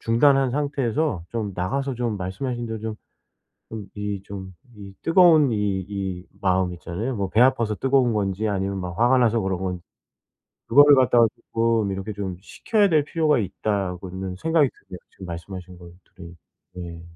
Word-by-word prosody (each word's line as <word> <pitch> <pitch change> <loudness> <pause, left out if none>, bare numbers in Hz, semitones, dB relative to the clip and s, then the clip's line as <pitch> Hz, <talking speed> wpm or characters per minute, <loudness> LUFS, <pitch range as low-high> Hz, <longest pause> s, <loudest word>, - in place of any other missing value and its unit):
중단한 135 +3 +3
상태에서 140 - -1
좀 110 -4 -3
나가서 135 +10 -2
좀 120 -3 -2
말씀하신 120 +7 -4
대로 110 -1 -4
좀 110 -1 -4 0.8
좀 105 -3 -7
이 105 -1 -4
좀 95 -2 -8 0.2
이 100 -2 -11
뜨거운 165 -5 +5
이 110 - 0 0.3
이 95 -3 -4 0.2
마음 95 -1 +1
있잖아요. 95 +9 -4
뭐 100 -3 -2
배 110 - +1
아파서 120 -4 +3
뜨거운 130 0 +2
건지 100 0 -1
아니면 100 -1 -2
막 90 -2 -6
화가 125 +2 +4
나서 115 -2 +3
그런 95 -1 -1
건지 90 -2 -4 0.8
그거를 145 0 +7
갖다가 125 -3 +5 0.3
쪼끔 115 -3 +1
이렇게 95 +2 -4
좀 95 -3 -5
식혀야 205 - +1
될 155 -4 +3
필요가 155 -1 +1
있다고는 95 -2 -3
생각이 160 - +2
드네요, 90 -6 -13
지금 95 - -11
말씀하신 90 +1 -8
것들이. 85 0 -14 0.4
예. 85 -2 -7
105 Hz, 330 characters per minute, -23 LUFS, 95-130 Hz, 0.8 s, 그거를